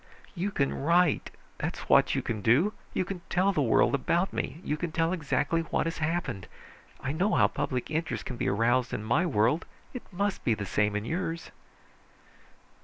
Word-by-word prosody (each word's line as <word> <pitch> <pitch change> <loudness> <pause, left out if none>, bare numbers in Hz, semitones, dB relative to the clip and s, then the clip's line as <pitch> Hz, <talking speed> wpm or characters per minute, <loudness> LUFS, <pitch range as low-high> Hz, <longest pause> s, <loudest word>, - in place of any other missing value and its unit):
"You 190 +2 -2
can 140 -8 0
write! 170 +2 +2 0.3
That's - - -3
what - - +5
you - - -1
can 110 -3 -3
do. 140 - +3 0.2
You 185 - -1
can 185 -1 -5
tell 190 +3 +2
the 150 - +1
world 125 +1 +3
about 170 +7 +1
me, 160 - -3
you 150 - -1
can 170 +1 -4
tell 165 +2 +1
exactly 165 0 0
what 165 - -1
has 165 0 -3
happened. 150 - -2 0.5
I 135 - -2
know 185 +8 +1
how - - +5
public 130 +2 -3
interest 160 +1 -2
can 125 - -5
be - - -1
aroused 120 +5 +2
in 105 - -4
my 140 +11 +2
world. 125 +4 +2 0.3
It 250 - -5
must 200 +2 -1
be 115 - +2
the 105 - -4
same 105 +2 +1
in 105 +1 -2
yours." 165 +2 -3
155 Hz, 185 wpm, -28 LUFS, 120-175 Hz, 0.5 s, what